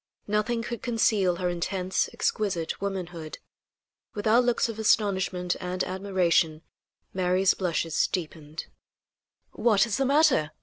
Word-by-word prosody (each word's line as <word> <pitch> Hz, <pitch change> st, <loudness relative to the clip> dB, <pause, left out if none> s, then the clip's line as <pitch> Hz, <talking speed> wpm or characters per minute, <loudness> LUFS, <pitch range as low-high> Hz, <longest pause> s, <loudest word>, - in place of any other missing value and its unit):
Nothing 215 Hz, +3 st, 0 dB
could 235 Hz, -1 st, -5 dB
conceal 215 Hz, -6 st, +2 dB
her 180 Hz, +1 st, -2 dB
intense, 180 Hz, +2 st, -1 dB
exquisite 185 Hz, -7 st, -2 dB
womanhood. 175 Hz, -5 st, -5 dB, 0.8 s
With 205 Hz, -, -4 dB
our 225 Hz, +3 st, +5 dB
looks 245 Hz, -1 st, +1 dB
of 225 Hz, -1 st, -6 dB
astonishment 190 Hz, -4 st, +1 dB
and 180 Hz, 0 st, -2 dB
admiration 180 Hz, -4 st, +1 dB, 0.5 s
Mary's 185 Hz, +1 st, +2 dB
blushes 165 Hz, -3 st, 0 dB
deepened. 160 Hz, -3 st, -5 dB, 0.9 s
"What 215 Hz, -3 st, +3 dB
is 220 Hz, -3 st, -2 dB
the 270 Hz, -, +1 dB
matter? 275 Hz, -, +3 dB
190 Hz, 120 wpm, -27 LUFS, 175-215 Hz, 0.9 s, our